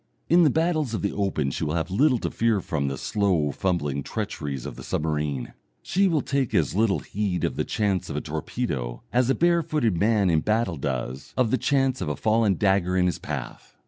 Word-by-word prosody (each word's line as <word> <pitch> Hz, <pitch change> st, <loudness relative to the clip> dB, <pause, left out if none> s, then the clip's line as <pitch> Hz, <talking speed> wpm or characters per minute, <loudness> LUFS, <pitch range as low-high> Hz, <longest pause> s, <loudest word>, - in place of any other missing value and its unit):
In 175 Hz, +2 st, +6 dB
the 160 Hz, -, +6 dB
battles 155 Hz, -5 st, 0 dB
of -, -, -4 dB
the 100 Hz, -, +1 dB
open 95 Hz, -9 st, -1 dB
she -, -, -3 dB
will 75 Hz, +1 st, -1 dB
have 85 Hz, +2 st, -2 dB
little 130 Hz, +6 st, +3 dB
to -, -, -3 dB
fear 115 Hz, -3 st, +1 dB
from 80 Hz, -5 st, -2 dB
the 70 Hz, -1 st, -3 dB
slow 90 Hz, -7 st, +1 dB
fumbling 75 Hz, -6 st, -1 dB
treacheries 75 Hz, -, -4 dB
of -, -, -6 dB
the -, -, -9 dB
submarine, 75 Hz, -4 st, -2 dB, 0.3 s
she 195 Hz, +3 st, +2 dB
will 160 Hz, -6 st, +1 dB
take 135 Hz, -4 st, -1 dB
as 75 Hz, -7 st, +2 dB
little 105 Hz, 0 st, +2 dB
heed 100 Hz, -3 st, -2 dB
of -, -, 0 dB
the -, -, 0 dB
chance 100 Hz, -4 st, -1 dB
of -, -, -4 dB
a -, -, -1 dB
torpedo 75 Hz, -, -4 dB
as 125 Hz, 0 st, +3 dB
a 135 Hz, -, +3 dB
barefooted 160 Hz, -, +2 dB
man 105 Hz, -3 st, +3 dB
in 80 Hz, -, +3 dB
battle 105 Hz, -2 st, 0 dB
does 65 Hz, 0 st, -4 dB
of 125 Hz, -4 st, +2 dB
the 130 Hz, -, +3 dB
chance 135 Hz, -1 st, +1 dB
of 85 Hz, -, -2 dB
a 75 Hz, -, -1 dB
fallen 110 Hz, +2 st, +2 dB
dagger 95 Hz, -1 st, +2 dB
in 90 Hz, -, +3 dB
his 90 Hz, -4 st, 0 dB
path. -, -, -7 dB
100 Hz, 210 wpm, -25 LUFS, 75-125 Hz, 0.3 s, In